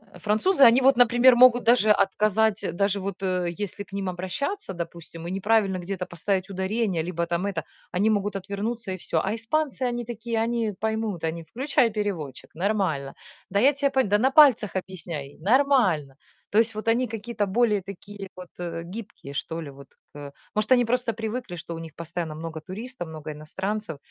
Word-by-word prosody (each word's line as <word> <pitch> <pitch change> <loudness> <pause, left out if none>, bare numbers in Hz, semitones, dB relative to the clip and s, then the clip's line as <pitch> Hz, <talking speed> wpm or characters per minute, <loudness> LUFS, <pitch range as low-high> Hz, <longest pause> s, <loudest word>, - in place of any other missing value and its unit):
Э, - - -12
французы, 270 - +3
они 245 +3 +5
вот, 265 -1 +5
например, 245 +1 +6
могут 245 0 +7
даже 230 -3 +5
отказать, 210 0 +2
даже 200 +1 +1
вот, 195 0 -5
э, 180 -2 0 0.2
если 200 +1 -5
к - - -23
ним 195 -2 -2
обращаться, 190 - -3
допустим, 170 -1 -7
и - - -4
неправильно 195 -1 +2
где-то 180 0 -4
поставить 185 +2 -2
ударение 190 -1 -1
либо 170 -1 -2
там 170 +3 -1
это, 195 -5 -2 0.3
они 200 +5 +2
могут 205 -1 0
отвернуться 200 +3 -4
и - - -2
всё. 160 -2 -1
А - - -1
испанцы- 265 +5 -2
они 240 -1 -3
такие, 230 -1 -3
они 230 -3 -1
поймут, 220 -5 -2
они: 165 +1 -2
"Включай 265 - +1
переводчик, 185 - -4
нормально. 175 -8 -1 0.4
Да 200 +1 +1
я 275 +5 +5
тя 280 0 +1
по 265 -1 +2
Да 205 -1 +2
на 260 +5 +2
пальцах 260 -10 +6
объясняй, 165 -6 -5
нормально". 215 - +3 0.4
То 210 - +3
есть 225 -1 +2
вот 215 +1 -6
они 240 +2 +3
какие-то 225 -1 -3
более 210 -1 +2
такие 200 +1 -9
вот, 180 -1 -8
э, 165 -1 -4
гибкие, 220 -11 -8
что 165 +3 -4
ли, 145 - -8
вот 140 0 -13 0.3
к - - -11
э. 140 -1 -8 0.2
Может, 215 +4 -1
они 245 -2 +6
просто 245 0 0
привыкли, 225 -3 -4
что 170 0 -6
у - - -6
них 165 -1 -8
постоянно 170 -1 -5
много 160 0 -6
туристов, 205 +2 -7
много 155 -1 -8
иностранцев, 190 +3 -4
200 Hz, 185 wpm, -25 LUFS, 175-230 Hz, 0.4 s, могут